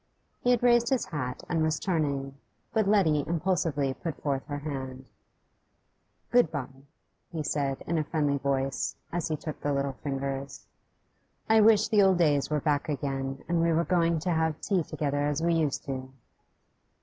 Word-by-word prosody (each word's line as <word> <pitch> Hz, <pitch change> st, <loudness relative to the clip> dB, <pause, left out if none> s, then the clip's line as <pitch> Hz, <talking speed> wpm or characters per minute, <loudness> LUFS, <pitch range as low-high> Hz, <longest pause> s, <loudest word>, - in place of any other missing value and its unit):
He 245 Hz, -, 0 dB
had 245 Hz, -1 st, +3 dB
raised 240 Hz, -1 st, +4 dB
his 260 Hz, -2 st, +1 dB
hat 130 Hz, -6 st, -4 dB
and 165 Hz, -2 st, 0 dB
was 155 Hz, 0 st, +1 dB
turning, 145 Hz, -8 st, -1 dB, 0.4 s
but 215 Hz, -2 st, +2 dB
Letty 165 Hz, -8 st, +3 dB
impulsively 160 Hz, -5 st, 0 dB
put 160 Hz, +2 st, -6 dB
forth 135 Hz, -2 st, 0 dB
her 145 Hz, -, -3 dB
hand. 135 Hz, -3 st, -5 dB, 1.3 s
'Good 245 Hz, -10 st, +4 dB
bye,' 135 Hz, -2 st, -6 dB, 0.4 s
he 160 Hz, -3 st, -3 dB
said, 140 Hz, -2 st, -1 dB
in 165 Hz, 0 st, 0 dB
a -, -, +1 dB
friendly 145 Hz, -2 st, 0 dB
voice, 135 Hz, 0 st, -1 dB, 0.2 s
as 175 Hz, -1 st, -1 dB
he 155 Hz, -, -1 dB
took 155 Hz, 0 st, -7 dB
the 145 Hz, -, 0 dB
little 140 Hz, -1 st, 0 dB
fingers. 135 Hz, 0 st, -4 dB, 0.8 s
'I 220 Hz, 0 st, +6 dB
wish 215 Hz, -1 st, +5 dB
the 215 Hz, -1 st, +4 dB
old 190 Hz, -2 st, +5 dB
days 150 Hz, -5 st, +2 dB
were 150 Hz, -1 st, 0 dB
back 145 Hz, 0 st, 0 dB
again, 135 Hz, -2 st, -3 dB
and 170 Hz, -1 st, +1 dB
we 170 Hz, 0 st, +3 dB
were 165 Hz, +1 st, +2 dB
going 170 Hz, -2 st, +2 dB
to 180 Hz, +2 st, -1 dB
have 160 Hz, -2 st, 0 dB
tea 195 Hz, -4 st, +1 dB
together 145 Hz, -2 st, -1 dB
as 150 Hz, +2 st, -1 dB
we 170 Hz, 0 st, +3 dB
used 155 Hz, -4 st, 0 dB
to. 130 Hz, -1 st, -5 dB
150 Hz, 175 wpm, -28 LUFS, 140-170 Hz, 1.3 s, I